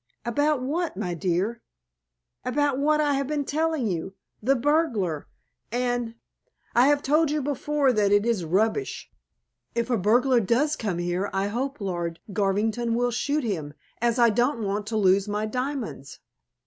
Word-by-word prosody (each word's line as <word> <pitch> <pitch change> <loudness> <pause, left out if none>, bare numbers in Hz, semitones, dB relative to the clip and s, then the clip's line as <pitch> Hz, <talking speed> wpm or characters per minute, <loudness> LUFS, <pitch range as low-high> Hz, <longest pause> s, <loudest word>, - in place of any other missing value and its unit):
"About 290 +3 +1
what, 320 - -2
my 180 -4 -2
dear?" 185 +7 -1 0.8
"About 275 +1 +1
what 305 +2 +3
I 295 -1 +2
have 275 -1 -1
been 295 -1 -1
telling 315 -2 0
you. 190 -1 -3 0.3
The 265 +5 +3
burglar, 240 - 0 0.4
and 245 -1 -1 0.3
" - - -39
"I 245 +3 +6
have 290 0 +3
told 305 +2 +3
you 300 +1 0
before, 285 -1 +1
that 205 -3 +2
it 205 +1 +4
is 230 -6 +1
rubbish. 220 - -1 0.6
If 235 +1 -1
a 240 - +3
burglar 245 +6 +4
does 250 +9 +1
come 200 - -2
here 175 +3 -1
I 195 +1 0
hope 265 +6 -3
Lord 175 -4 -3
Garvington 215 +4 0
will 245 +1 +1
shoot 285 +5 0
him, 160 -10 -3 0.3
as 235 0 +2
I 235 -2 +5
don't 240 +2 +1
want 205 +1 -2
to 220 0 -1
lose 195 0 +3
my 210 +1 -1
diamonds." 250 - -4
235 Hz, 160 wpm, -25 LUFS, 200-280 Hz, 0.8 s, I